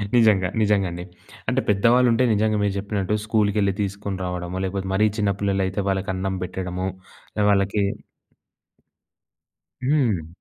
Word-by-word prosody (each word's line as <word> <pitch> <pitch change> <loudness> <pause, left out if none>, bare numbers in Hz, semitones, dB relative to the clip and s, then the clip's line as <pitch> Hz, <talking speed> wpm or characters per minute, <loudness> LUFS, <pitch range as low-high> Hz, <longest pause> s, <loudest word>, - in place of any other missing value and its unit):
నిజంగా. 105 -6 +4
నిజంగాండి. 95 -4 +1 0.5
అంటే - - +1
పెద్దవాళ్ళు 120 +5 +4
ఉంటే 120 +3 +3
నిజంగా 110 0 +1
మీరు 100 -1 +1
జెప్పినట్టు 100 0 -1
స్కూల్‌కెళ్లి 105 -3 +2
తీసుకొని 100 0 -3
రావడమొ 90 0 -4
లేకపోతే 95 0 -3
మరీ 105 +3 +4
చిన్న 105 -2 +2
పిల్లలు 100 -1 +1
అయితే 95 +2 -3
వాళ్ళకి 95 0 -1
అన్నం 95 0 -2
బెట్టడము. 90 0 -4 0.6
వాళ్ళకి 100 +1 +2 2.0
హ్మ్. 120 - +1
100 Hz, 120 wpm, -23 LUFS, 95-105 Hz, 2.0 s, నిజంగా